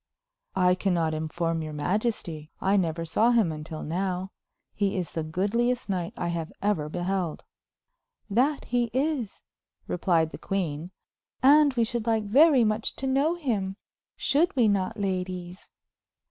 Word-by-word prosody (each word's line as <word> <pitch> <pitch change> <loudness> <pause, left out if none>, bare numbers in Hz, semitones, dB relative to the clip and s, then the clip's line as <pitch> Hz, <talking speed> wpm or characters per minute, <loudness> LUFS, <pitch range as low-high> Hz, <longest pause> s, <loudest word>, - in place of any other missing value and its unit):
"I 180 0 +4
can 185 0 0
not 160 -2 +1
inform 165 +1 -2
your 155 -1 -5
majesty. 170 -2 -2
I 195 +1 +2
never 165 -3 0
saw 215 +8 +3
him 225 -8 +3
until 155 0 -6
now. 185 +3 -2 0.4
He 200 -2 0
is 175 -4 -3
the 165 - -2
goodliest 205 +10 0
knight 180 -3 -2
I 170 - -2
have 165 -1 -3
ever 195 -7 0
beheld." 180 0 -2 0.8
"That 260 +8 +1
he 245 0 +1
is," 265 -5 -1 0.4
replied 165 -3 +1
the - - -8
queen; 175 -5 -2 0.5
"and 285 0 +6
we 235 - +3
should 235 0 -3
like 225 -1 +2
very 265 +5 +5
much 215 0 0
to 270 - -4
know 275 +5 +2
him. 215 - -2 0.4
Should 310 +4 +2
we 240 -4 +4
not, 205 +2 0
ladies?" 185 -2 -4
195 Hz, 145 wpm, -27 LUFS, 170-235 Hz, 0.8 s, and